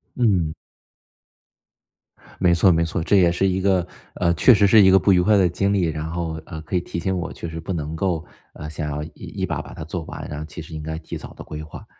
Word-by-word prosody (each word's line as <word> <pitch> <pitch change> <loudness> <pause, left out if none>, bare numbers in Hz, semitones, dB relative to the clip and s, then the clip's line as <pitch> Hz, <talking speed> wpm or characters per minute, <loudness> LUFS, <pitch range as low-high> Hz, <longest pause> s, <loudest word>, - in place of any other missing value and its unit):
嗯。 95 -10 +2 1.9
没 90 -2 +4
错 85 +2 +5
没 85 -1 +2
错， 80 0 -2
这 100 - +3
也 90 -3 +5
是 95 +3 +1
一 95 0 0
个 95 -2 +2 0.3
呃， 85 -1 +2
确 125 - +6
实 100 -2 +4
是 110 +2 +7
一 95 - +7
个 95 - +7
不 100 - +3
愉 90 -2 +5
快 105 +3 +4
的 95 -2 +4
经 100 +3 0
历， 100 -3 +2
然 80 -1 -3
后， 85 -1 -3
呃， 80 -3 -7
可 80 +4 -5
以 - - +4
提 85 - -5
醒 95 +3 -1
我 90 - -4
确 85 - -6
实 80 0 -6
不 80 +4 -4
能 80 -1 -4
够， 85 -1 -1 0.3
呃， 75 - -8
想 75 0 -4
要 75 +1 -3
一 - - -5
把 - - -3
把 - - -11
它 - - -7
做 80 +3 -5
完， - - -8
然 75 - -5
后 75 - -5
其 80 +2 -9
实 80 +1 -11
应 80 - -5
该 80 +1 -4
提 80 - -7
早 - - -10
地 - - -10
规 75 0 -7
划。 80 - -11
85 Hz, 275 characters per minute, -22 LUFS, 80-95 Hz, 1.9 s, 是